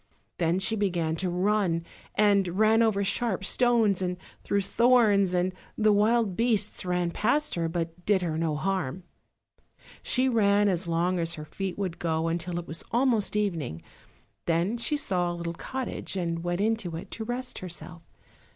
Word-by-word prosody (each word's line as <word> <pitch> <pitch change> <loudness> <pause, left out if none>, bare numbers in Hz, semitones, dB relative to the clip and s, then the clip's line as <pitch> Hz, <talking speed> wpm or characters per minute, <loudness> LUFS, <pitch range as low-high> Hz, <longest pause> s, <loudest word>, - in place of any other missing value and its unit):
Then 170 +1 +2
she 190 +4 0
began 175 -6 0
to 185 +2 -1
run, 180 -2 +1 0.3
and 200 -4 +3
ran 220 +1 +5
over 215 -3 +2
sharp 195 -1 0
stones 225 -5 +3
and 180 -1 -1 0.3
through 200 - +1
thorns, 210 -4 +3
and 180 +1 +1 0.2
the 215 -1 +4
wild 215 -1 +2
beasts 220 -2 0
ran 180 -1 0
past 265 - +1
her, 165 -1 -1
but 165 +1 -4
did 195 -2 +2
her 165 -3 -1
no 160 -1 0
harm. 185 -1 -2 1.0
She 255 +1 +1
ran 205 -4 +3
as 180 -2 0
long 175 +2 +1
as 165 0 -2
her 150 - -7
feet 190 +4 -5
would 185 -4 -3
go 160 -1 0
until 170 +1 -2
it 175 - -4
was 165 - -5
almost 235 -5 +1
evening; 165 - -2 0.6
then 170 +6 +1
she 295 +5 0
saw 180 -10 0
a - - -4
little 170 -1 -4
cottage 260 +3 -4
and 170 -2 -2
went 175 +2 -1
into 215 -6 -1
it 165 - -8
to 225 - -4
rest 250 +2 -4
herself. 175 -1 -7
190 Hz, 170 wpm, -27 LUFS, 170-215 Hz, 1.0 s, ran